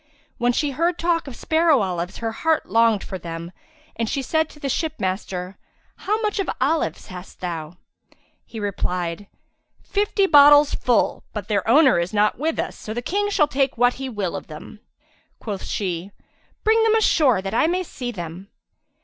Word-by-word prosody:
When 240 +1 +3
she 290 +3 0
heard 335 +5 0
talk 335 -2 0
of 265 - -8
sparrow 315 -3 +2
olives 180 -1 -3
her 225 -1 -3
heart 320 +7 0
longed 225 0 +3
for 190 - -6
them 170 0 -7 0.4
and 230 -2 -2
she 275 - -2
said 315 +3 0
to 295 - -16
the 280 - -4
ship 310 +3 -1
master, 185 0 -4 0.4
"How 425 +3 -1
much 420 -2 -1
of 390 - -1
olives 300 +5 -1
hast 180 0 -10
thou?" 170 -2 -5 0.7
He 225 - -9
replied, 180 -2 -3 0.6
"Fifty 405 0 +1
bottles 290 -3 +7
full, 245 -3 +1
but 210 -2 -5
their 200 -2 0
owner 270 - +5
is 170 +5 -3
not 210 +2 +2
with 320 +2 -1
us, - - -3
so 215 - -7
the 240 - -3
King 410 +8 0
shall 305 -7 +3
take 275 -3 0
what 245 +1 +4
he 265 - -3
will 205 -7 -3
of - - -7
them." 155 +7 -11 0.6
Quoth 205 -4 -5
she, 180 -2 -3 0.5
"Bring 445 +1 +4
them 445 0 +4
ashore, 300 - +3
that 195 +1 -4
I 240 - +3
may 365 +2 0
see 250 -7 -6
them.'' 175 -1 -8
240 Hz, 180 wpm, -22 LUFS, 190-315 Hz, 0.7 s, bottles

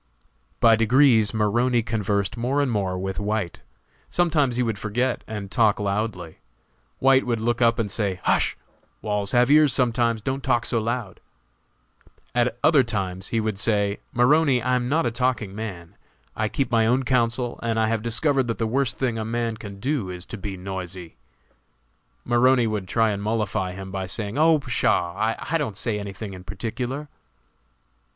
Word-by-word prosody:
By 115 -1 +6
degrees 115 -1 +4
Maroney 120 +3 +1
conversed 105 -2 -1
more 125 +4 -1
and 140 -3 +1
more 95 -4 -1
with 95 +2 -3
White; 105 -3 -2 0.5
sometimes 155 -8 +1
he 125 - +1
would 110 -4 -2
forget 120 +5 -1
and 105 -3 -6
talk 110 -3 +3
loudly. 100 -4 -3 0.6
White 135 0 +4
would 120 -2 0
look 120 +2 -1
up 115 0 +4
and 105 -4 -2
say, 100 -4 -2
"Hush! - - +1 0.5
walls 105 -2 -1
have 125 +2 +4
ears 150 -3 +6
sometimes, 120 -2 +1
don't 135 +5 -3
talk 120 -3 +1
so 115 - 0
loud." 115 -3 -3 1.1
At 120 -1 +1
other 155 -3 +6
times 95 -5 -3
he 115 - -1
would 110 -2 -2
say, 105 -2 +1
"Maroney, 135 +2 +4
I 125 +2 -1
am 125 -1 -1
not 155 +2 +2
a 120 - 0
talking 120 -4 -1
man; 95 -6 -7 0.4
I 110 0 -1
keep 135 +1 -2
my 115 -1 +3
own 125 +3 +2
counsel, 120 -1 0
and 115 -1 -1
have 110 0 +1
discovered 130 +3 +1
that 115 - -2
the 115 - -1
worst 125 +2 0
thing 120 -4 -1
a - - -2
man 115 0 -2
can 100 -2 -9
do 130 -5 -1
is 90 +1 -6
to - - -7
be 95 -1 -5
noisy." 90 -2 -7 1.1
Maroney 125 +1 +4
would 105 -4 -2
try 115 +2 +2
and 100 -1 -3
mollify 105 -4 -1
him 95 0 -8
by 95 0 -4
saying, 105 +5 -4
"Oh, 160 0 +5
pshaw! 120 - 0 0.2
I 165 - -1
didn't 115 -10 -3
say 110 -2 -1
any 100 -1 -5
thing 100 +1 -7
in 90 -1 -10
particular." 125 +9 -4
115 Hz, 175 wpm, -24 LUFS, 100-125 Hz, 1.1 s, By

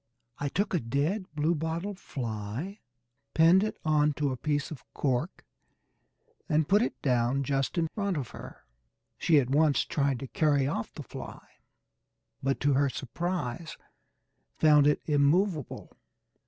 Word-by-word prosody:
I 145 - -1
took 200 +7 -1
a 175 - +3
dead 150 - -1
bluebottle 160 +5 -1
fly, 125 - -5 0.6
pinned 170 +4 +6
it 215 - -3
on 150 -1 +3
to 145 -1 -1
a - - -2
piece 145 +3 -2
of 150 - -8
cork, 135 +5 -1 1.0
and 155 -1 +2
put 205 +3 +4
it 245 - -2
down 125 +1 +2
just 135 +4 -1
in 165 -1 +2
front 200 -3 -2
of 135 -5 -4
her. - - -11 0.5
She 160 - +4
at 130 -1 -1
once 150 0 +3
tried 140 -3 0
to 135 - -5
carry 145 -1 +2
off 130 -4 -2
the - - -8
fly, - - -9 1.0
but 135 0 0
to 145 0 +3
her 140 +1 +3
surprise 160 +2 -4 0.8
found 150 -2 +6
it 150 - +2
immovable. 150 - +1
150 Hz, 140 wpm, -29 LUFS, 135-170 Hz, 1.0 s, pinned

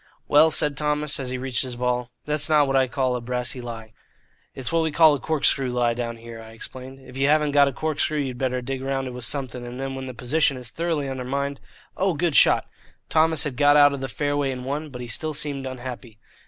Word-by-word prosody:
"Well," 150 +2 +6
said 150 -2 +3
Thomas, 150 -1 0
as 130 -2 -3
he 130 - -3
reached 130 0 -1
his 130 -2 -2
ball, 125 0 -1 0.2
"that's 150 +1 +1
not 150 -2 +5
what 135 0 -1
I 130 -1 +4
call 130 -1 0
a 125 - -3
brassy 125 +1 -2
lie." 115 -2 -8 0.6
"It's 130 -3 -3
what 165 0 +2
we 160 - +1
call 160 0 +6
a 145 - -1
corkscrew 140 -2 +1
lie 120 -1 +1
down 115 -1 -4
here," 115 0 -10
I 110 0 -12
explained. 130 +3 -9
"If 125 - -10
you 135 +1 +2
haven't 150 0 +3
got 140 0 +5
a - - 0
corkscrew 155 +2 -1
you'd 130 -4 -3
better 125 -1 -1
dig 135 +1 -4
round 135 0 -2
it - - -5
with 125 -1 -5
something, 130 -3 -3
and 120 +1 -7
then 135 0 -3
when 135 0 -6
the 130 - -7
position 140 +3 +1
is 125 -2 -6
thoroughly 165 -4 -1
undermined 135 +2 -3 0.4
Oh, 190 -2 +1
good 165 -1 0
shot!" - - +5 0.4
Thomas 160 -2 +2
had 145 -5 -3
got 145 +1 +5
out 145 -1 +7
of 140 - -5
the 135 - -2
fairway 145 0 -1
in 125 -1 -4
one, 145 +4 -3
but 125 -3 -8
he 120 - -6
still 155 +6 -3
seemed 140 -2 -2
unhappy. 125 -3 -8
135 Hz, 235 wpm, -24 LUFS, 125-145 Hz, 0.6 s, out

